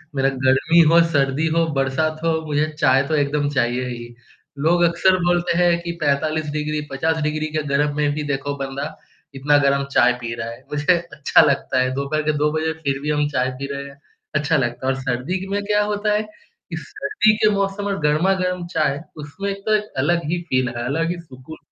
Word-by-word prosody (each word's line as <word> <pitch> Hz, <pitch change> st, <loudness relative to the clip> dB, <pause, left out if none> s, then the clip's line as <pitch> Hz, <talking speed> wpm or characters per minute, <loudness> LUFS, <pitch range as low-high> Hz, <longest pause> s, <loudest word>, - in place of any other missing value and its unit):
मेरा 135 Hz, 0 st, +2 dB
गर्मी 135 Hz, +5 st, +2 dB
हो, 170 Hz, 0 st, +7 dB
सर्दी 140 Hz, +1 st, +1 dB
हो, 165 Hz, 0 st, +3 dB
बरसात 145 Hz, +3 st, 0 dB
हो, 165 Hz, -1 st, +1 dB
मुझे 150 Hz, +1 st, 0 dB
चाय 135 Hz, 0 st, +4 dB
तो 155 Hz, -, 0 dB
एकदम 145 Hz, 0 st, 0 dB
चाहिए 125 Hz, -2 st, 0 dB
ही। 120 Hz, -1 st, -7 dB, 0.4 s
लोग 170 Hz, +4 st, +2 dB
अक्सर 170 Hz, +2 st, +3 dB
बोलते 175 Hz, -1 st, +1 dB
हैं 175 Hz, -1 st, +4 dB
कि 170 Hz, -, -4 dB
45 155 Hz, +2 st, 0 dB
डिग्री, 150 Hz, 0 st, -2 dB
50 160 Hz, +3 st, 0 dB
डिग्री 155 Hz, +1 st, -1 dB
के 155 Hz, -1 st, -1 dB
गर्म 145 Hz, +1 st, +1 dB
में 150 Hz, -1 st, +1 dB
भी 150 Hz, -, -3 dB
देखो 140 Hz, +1 st, -2 dB
बंदा, 140 Hz, +1 st, -5 dB, 0.4 s
इतना 145 Hz, +2 st, +3 dB
गरम 140 Hz, -1 st, +2 dB
चाय 125 Hz, -, +4 dB
पी 115 Hz, -1 st, -4 dB
रहा 115 Hz, 0 st, -5 dB
है। 115 Hz, -, -10 dB
मुझे 150 Hz, +5 st, +3 dB, 0.2 s
अच्छा 150 Hz, -, +4 dB
लगता 135 Hz, -2 st, +1 dB
है 130 Hz, -, +1 dB
2 140 Hz, 0 st, -2 dB, 0.5 s
बजे 160 Hz, 0 st, -1 dB
फिर 140 Hz, -1 st, -1 dB
भी 150 Hz, -, -3 dB
हम 150 Hz, -1 st, +1 dB
चाय 130 Hz, -2 st, 0 dB
पी 140 Hz, -, -4 dB
रहे 140 Hz, 0 st, -5 dB
हैं। 140 Hz, 0 st, -17 dB, 0.4 s
अच्छा 150 Hz, +3 st, +1 dB
लगता 120 Hz, 0 st, -2 dB
है 135 Hz, -, +3 dB
और 135 Hz, -, -6 dB
सर्दी 135 Hz, +10 st, -2 dB
में 200 Hz, +1 st, -1 dB
क्या 210 Hz, 0 st, +2 dB
होता 210 Hz, 0 st, 0 dB
है? 210 Hz, -, +2 dB
कि 215 Hz, -, -12 dB
सर्दी 215 Hz, -, +1 dB
के 215 Hz, -, +4 dB
मौसम 200 Hz, 0 st, -1 dB
में 195 Hz, -4 st, -2 dB
गरमा-गरम 180 Hz, +3 st, +1 dB
चाय, 150 Hz, -2 st, +1 dB, 0.2 s
उसमें 150 Hz, +7 st, -5 dB
एक 195 Hz, 0 st, -8 dB
तो 215 Hz, -, +2 dB
एक 210 Hz, 0 st, -2 dB
अलग 170 Hz, +5 st, +1 dB
ही 175 Hz, -, -1 dB
फ़ील 130 Hz, 0 st, +1 dB
है, 120 Hz, 0 st, -5 dB
अलग 165 Hz, +6 st, -1 dB
ही 175 Hz, -, -5 dB
सुकून 145 Hz, -1 st, -12 dB
150 Hz, 205 wpm, -21 LUFS, 135-170 Hz, 0.5 s, हो